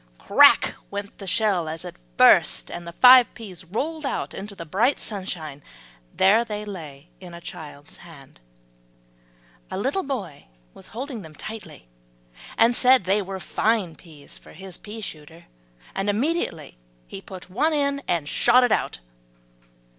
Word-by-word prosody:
"Crack" - - +5 0.2
went 200 0 -7
the 195 - -8
shell 185 -4 +1
as 160 +1 -6
it - - -8 0.2
burst, - - +5
and 175 0 -7
the - - -6
five 250 +6 +7
peas 195 -7 -10
rolled 295 - -4
out 275 - -3
into 200 +1 -7
the 170 -3 -8
bright 220 - +1
sunshine. 170 -8 -5 0.5
There 200 +5 +4
they 210 -2 -5
lay 160 -6 -9
in 180 -2 -11
a - - -9
child's 155 -4 -10
hand. 145 - -15 1.3
A - - -5
little 270 - 0
boy 210 - -6 0.3
was - - -10
holding 250 0 -6
them 160 -3 -13
tightly, 175 - -9 0.7
and 230 +1 +4
said 255 -3 +5
they 195 +3 +2
were 190 0 -6
fine 210 -2 0
peas 155 -5 -13
for - - -16
his 190 -2 -10
pea 220 +1 -9
shooter. 160 -2 -10 0.5
And 195 +1 -2
immediately 205 - -2 0.3
he 80 +11 -9
put 185 -1 -11
one 300 - +1
in 280 -2 0
and 165 -4 -1
shot 245 +9 +4
it 245 - +2
out. - - 0
195 Hz, 155 wpm, -24 LUFS, 165-230 Hz, 1.3 s, five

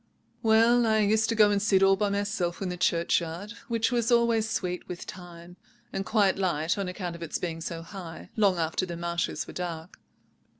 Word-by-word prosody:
"Well, 230 +1 +4
I 220 0 +3
used 220 +2 +2
to 230 - +1
go 210 -1 +5
and 200 -1 +1
sit 195 -2 +3
all 195 0 +6
by 205 +1 0
myself 200 -4 -1
in 195 - -3
the 180 - -3
churchyard, 170 +2 0 0.2
which 230 0 0
was 240 0 +1
always 235 -2 +3
sweet 180 -5 -3
with 175 - -6
thyme, 175 -1 -11 0.4
and 195 - -2
quite 200 -3 +2
light 170 -4 0
(on 200 -2 -3
account 180 -1 -5
of 170 - -11
its 165 - -3
being 165 -2 -4
so 165 0 -5
high) 170 -2 -9
long 200 -4 +3
after 165 +3 -1
the 170 -1 -5
marshes 170 0 -2
were - - -10
dark. 170 -1 -6
190 Hz, 200 wpm, -27 LUFS, 170-215 Hz, 0.4 s, all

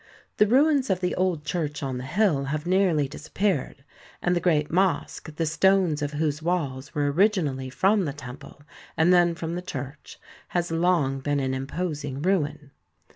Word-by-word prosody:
The 210 - +5
ruins 275 +3 +3
of 185 - +1
the 180 -1 -1
old 180 -5 -1
church 150 -4 -3
on 130 -2 -3
the 130 - -6
hill 160 -3 +1
have 150 +3 -3
nearly 175 -6 +2
disappeared, 155 -1 -2 0.4
and 175 0 +1
the - - +2
great 155 -4 +1
mosque, 180 -3 0
the 165 - -1
stones 180 -1 +2
of 145 0 -2
whose 150 0 -1
walls 145 -6 -2
were 145 -1 +1
originally 155 -8 +1
from 195 +7 +2
the 145 - -2
temple, 140 +1 -11 0.3
and 165 +3 +4
then 175 -1 +4
from 165 0 -4
the 175 - -3
church, 140 -4 -8 0.4
has 175 -1 -1
long 165 -5 +1
been 145 +1 -1
an 130 -1 -1
imposing 145 0 -4
ruin. 150 -6 -1
160 Hz, 170 wpm, -25 LUFS, 145-180 Hz, 0.4 s, The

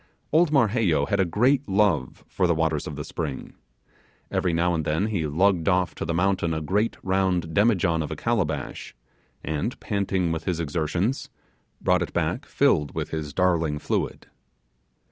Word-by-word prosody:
Old 160 0 +4
Marheyo 110 - +3
had 100 - 0
a 95 - +4
great 125 +9 +2
love 95 -9 +1
for 90 - 0
the 85 - +2
waters 80 -2 0
of 75 - -5
the 75 - -5
spring. 75 -3 -5 0.8
Every 90 - +1
now 85 +2 +1
and 80 -2 -1
then 80 +7 0
he 95 -8 -1
lugged 90 +3 +2
off 90 -4 +1
to - - -5
the 80 - -2
mountain 90 -2 +1
a - - -1
great 105 +8 0
round 95 -3 0
demijohn 95 -6 +2
of 75 - -4
a 80 - -4
calabash, 80 - -2 0.5
and, 80 - -3
panting 95 -4 -1
with 80 0 -3
his 90 -3 -1
exertions, 85 - -1 0.5
brought - - +2
it - - -3
back - - -1
filled 75 -2 +2
with - - -3
his 75 -2 -4
darling 85 -3 +1
fluid. - - -2
85 Hz, 165 wpm, -25 LUFS, 80-100 Hz, 0.8 s, Old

